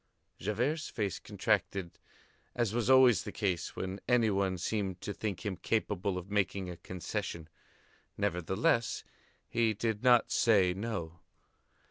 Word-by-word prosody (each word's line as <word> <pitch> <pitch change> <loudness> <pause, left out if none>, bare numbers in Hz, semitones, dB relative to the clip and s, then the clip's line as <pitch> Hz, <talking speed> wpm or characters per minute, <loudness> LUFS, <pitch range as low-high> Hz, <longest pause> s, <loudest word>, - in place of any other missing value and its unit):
Javert's 125 - -1
face 100 -5 -2
contracted 95 -4 -1 0.6
as 115 -4 0
was 120 +1 0
always 130 -6 +7
the - - -6
case 95 -5 -2
when 95 +1 -4
any 120 -3 +4
one 95 -1 0
seemed 95 0 -2
to 105 - -4
think 105 0 -4
him 100 -2 -1
capable 100 -4 -1
of 90 +2 -7
making 100 -2 0
a 85 - -8
concession. 85 -2 -5 0.7
Nevertheless, 100 +4 +1 0.4
he 115 -2 +1
did 110 0 -1
not 125 -2 +5
say 100 -6 +4
"no." 95 -5 -4
100 Hz, 130 wpm, -32 LUFS, 95-115 Hz, 0.7 s, always